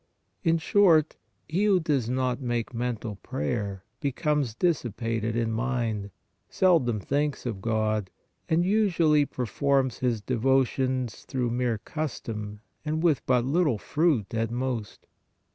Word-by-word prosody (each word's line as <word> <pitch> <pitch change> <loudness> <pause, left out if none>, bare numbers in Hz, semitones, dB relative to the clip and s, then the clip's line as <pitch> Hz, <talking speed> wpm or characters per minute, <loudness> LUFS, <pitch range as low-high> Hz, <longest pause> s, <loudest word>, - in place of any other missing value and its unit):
In 165 -2 +3
short, 165 -2 +4 0.3
he 180 +7 +1
who 200 -3 +4
does 140 -8 0
not 130 0 0
make 120 -2 -2
mental 115 -3 -3
prayer, 105 -6 -3 0.2
becomes 140 -3 0
dis 170 +3 +2
sipated 115 -1 -2
in 115 -1 0
mind, 115 -4 -1 0.4
seldom 150 - +3
thinks 145 +7 -1
of 110 -6 -3
God 110 -3 0 0.4
and 165 +2 +3
usually 170 -8 +3
performs 130 +1 0
his 120 -3 0
devotions 130 +1 0
through 125 -3 -1
mere 120 -1 0
custom 105 -7 -5 0.2
and 155 +1 -2
with 160 -5 +3
but 125 -2 +3
little 150 -3 +2
fruit 145 - 0
at 115 0 0
most. 120 -3 -4
125 Hz, 125 wpm, -27 LUFS, 115-150 Hz, 0.4 s, short